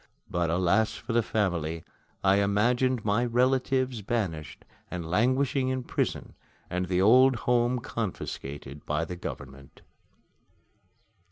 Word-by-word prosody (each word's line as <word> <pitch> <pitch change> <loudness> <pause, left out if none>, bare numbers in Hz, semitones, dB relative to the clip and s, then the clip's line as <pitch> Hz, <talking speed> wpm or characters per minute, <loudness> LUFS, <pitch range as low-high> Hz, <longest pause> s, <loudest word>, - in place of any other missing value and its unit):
But 85 -2 -1
alas 90 +6 +2
for 115 - -5
the 120 - +4
family! 85 -7 -1 0.4
I 95 0 +4
imagined 115 +5 +2
my 105 +3 +2
relatives 130 0 +1
banished 95 -8 -3 0.2
and 85 -3 -5
languishing 130 - +1
in 130 -1 -2
prison, - - -2 0.4
and 90 0 -1
the 90 +1 +1
old 130 +5 +6
home 120 0 +2
confiscated 75 - -5
by 75 +2 0
the 90 - -6
government! 70 -5 -9
105 Hz, 115 wpm, -28 LUFS, 85-125 Hz, 0.4 s, old